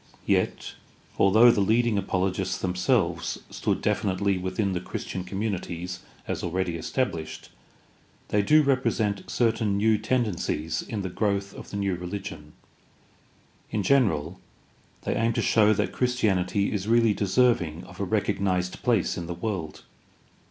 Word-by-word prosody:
Yet, - - 0 0.5
although 110 +5 +7
the 105 - +1
leading 115 +3 +2
apologists 95 -1 -1
themselves 90 -1 0
stood - - -1
definitely 100 0 +1
within 95 +2 -1
the 90 - -2
Christian 95 0 -5
communities 90 -3 -4 0.3
as - - -2
already 90 0 -1
established, 85 - -3 0.8
they 105 - +3
do 155 +9 +5
represent 115 -7 0
certain 110 -4 +1
new 110 +1 +3
tendencies 105 -9 -1
in 105 -3 -5
the 95 - -3
growth 100 0 -1
of - - -10
the 100 - -5
new 100 -1 0
religion. 90 -4 -6 1.2
In 105 - -1
general, 95 - +2 0.6
they - - -1
aim 115 +1 +1
to - - 0
show 110 -1 +4
that 105 - 0
Christianity 100 -6 +1
is 100 -1 -2
really 115 -1 +4
deserving 100 -6 +1
of 90 +1 -13
a - - -1
recognized 95 -2 0
place 115 -8 +1
in 85 - -6
the 85 - -4
world. 90 -5 -4
100 Hz, 135 wpm, -26 LUFS, 90-110 Hz, 1.2 s, although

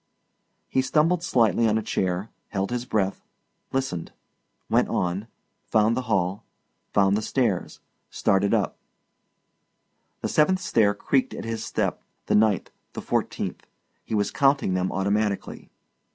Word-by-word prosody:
He 130 - +1
stumbled 155 +6 +2
slightly 115 - +3
on 110 0 +2
a 110 - -2
chair, 95 +2 -1 0.2
held 100 +1 -2
his 125 0 -2
breath, 100 -5 -1 0.5
listened, 130 -11 -2 0.6
went - - +3
on, 90 +4 -1 0.4
found 110 +1 +3
the 130 - 0
hall, 95 -1 0 0.5
found 100 -1 +4
the 105 - 0
stairs, 110 -4 -1 0.3
started 100 +1 +2
up; - - 0 1.4
the - - -1
seventh 185 +5 +3
stair 110 - +2
creaked 255 - 0
at - - -6
his 115 -1 -3
step, - - -1 0.2
the - - 0
ninth, 105 -3 +3 0.2
the - - -5
fourteenth. - - -2 0.4
He - - -3
was 100 -1 +1
counting 135 -8 +2
them 90 0 0
automatically. 100 +1 -1
110 Hz, 135 wpm, -25 LUFS, 95-125 Hz, 1.4 s, found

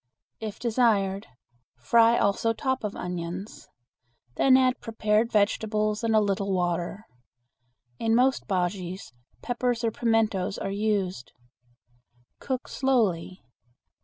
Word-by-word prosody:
If 215 -2 -6
desired, 215 -4 +1 0.5
fry 230 - +4
also 200 +3 +1
top 260 +1 -2
of 210 -1 -3
onions. 180 +3 -6 0.7
Then 260 -1 +5
add 255 -1 +2
prepared 225 0 0
vegetables 215 +1 +1
and 225 -1 +2
a - - +6
little 200 -1 -1
water. 175 +2 -2 0.9
In 225 0 +2
most 260 +2 +2
bujeas, 185 - -3 0.3
peppers 245 -1 -1
or 225 - +1
pimentos 220 -4 0
are 195 - -4
used. 200 - -2 1.1
Cook 260 -2 -4
slowly. 205 - 0
215 Hz, 105 wpm, -26 LUFS, 190-230 Hz, 1.1 s, a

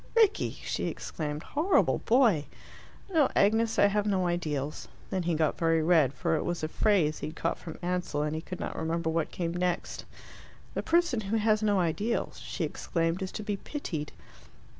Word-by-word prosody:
"Rickie!" 445 -4 +3
she - - -2
exclaimed. 150 -1 -4
"Horrible 325 +7 +2
boy!" 225 - +3 0.7
"No, 305 -5 +4
Agnes, 220 +2 +3
I - - +6
have 205 +1 +1
no 190 -3 +1
ideals." 155 -5 -2 0.2
Then 190 -2 0
he 170 -1 0
got 155 -1 +1
very 165 -1 +3
red, 160 -6 +4
for 125 +5 0
it 155 - -1
was 175 -2 -3
a - - +1
phrase 160 -4 +2
he - - -4
had 155 - -8
caught 165 - -1
from 160 - -8
Ansell, 175 -4 -1
and 150 0 -1
he 160 - -3
could 185 +1 -7
not - - -4
remember 160 0 -1
what 165 -1 0
came 170 -2 -3
next. 180 0 -2 0.7
"The - - -1
person 340 -9 +2
who 210 +2 -1
has 215 0 +2
no 205 -2 +2
ideals," 205 +7 -1
she - - -4
exclaimed, 165 +2 -1
"is 190 - -3
to 215 - -5
be 205 -1 -2
pitied." 165 - -5
175 Hz, 185 wpm, -29 LUFS, 160-210 Hz, 0.7 s, I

